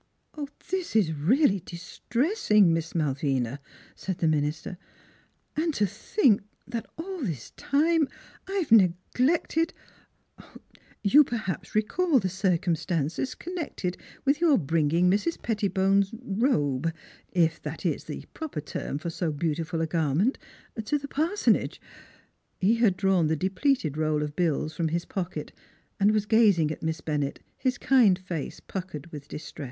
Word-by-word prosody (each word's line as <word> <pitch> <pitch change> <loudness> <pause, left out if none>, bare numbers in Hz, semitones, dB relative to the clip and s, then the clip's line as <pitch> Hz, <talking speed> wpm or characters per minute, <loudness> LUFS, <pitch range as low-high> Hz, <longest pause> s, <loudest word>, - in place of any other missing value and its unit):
" 290 +2 -8
This 370 -9 -2
is 190 -8 +3
really 200 - +3
distressing, 210 - +1
Miss 165 +1 -2
Malvina," 135 -4 0 0.4
said 190 -2 -4
the 165 - +1
minister, 155 +3 -1 0.4
" - - -39
and 315 0 0
to 210 - +3
think 210 - +2 0.3
that 235 -2 -4
all 365 +2 -5
this 165 - -4
time 310 +1 +2 0.4
I 385 - -5
have 370 - -1
neglected 250 - +3 1.3
You 275 +9 +7
perhaps 220 -9 -4
recall 295 +9 +2
the 190 -6 +1
circumstances 175 - 0
connected 315 - -4 0.3
with 285 +3 +2
your 315 -6 +5
bringing 165 +2 +2
Mrs. 210 - +1
Pettibone's 195 -2 +1
er - - -9
robe, 165 - +1 0.4
if 165 -2 +2
that - - -6
is - - -1
the - - -7
proper 315 - -5
term 140 -1 -4
for 165 +3 -4
so 165 -1 -1
beautiful 160 +2 -2
a - - +2
garment 160 - +1 0.4
to 295 +7 +1
the 280 0 -7
par 315 +7 0
sonage." - - +2 0.8
He 215 +5 +3
had 215 -6 +3
drawn 190 -4 +3
the 160 - +1
depleted 190 - 0
roll 155 -1 +1
of 150 0 -5
bills 160 -3 0
from 165 - 0
his 170 +2 -1
pocket 185 -2 -4 0.5
and 200 +1 +5
was 215 -1 +1
gazing 205 -9 +4
at - - -6
Miss 160 -1 -2
Bennett, 145 -3 -2
his 255 -2 -1
kind 235 -9 +5
face 180 -5 -5
puckered 180 -6 -6
with 145 -2 -8
distress. 150 - -9
190 Hz, 145 wpm, -27 LUFS, 160-255 Hz, 1.3 s, You